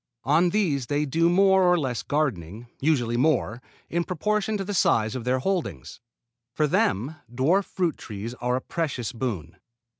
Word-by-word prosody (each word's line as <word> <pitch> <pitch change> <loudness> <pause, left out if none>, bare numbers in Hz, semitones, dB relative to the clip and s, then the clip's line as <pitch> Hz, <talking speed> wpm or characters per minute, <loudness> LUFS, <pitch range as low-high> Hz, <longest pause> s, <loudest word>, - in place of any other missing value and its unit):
On 160 +7 +3
these 160 - 0
they 145 +3 0
do 165 +4 +2
more 190 +1 +4
or 180 -1 +4
less 130 -7 -2
gardening, 115 - -2
usually 125 -6 +1
more, 125 -4 +1 0.3
in 170 +1 -1
proportion 210 +5 -1
to 195 - -3
the 205 - -4
size 110 - +2
of 125 -2 -5
their 125 +1 +2
holdings. 130 - -3 0.6
For 155 - +2
them 140 +1 0
dwarf 160 +11 +2
fruit 175 -4 -2
trees 110 +2 -6
are 125 0 +1
a 130 - -2
precious 140 -9 -3
boon. 115 - -4
145 Hz, 160 wpm, -25 LUFS, 120-175 Hz, 0.6 s, more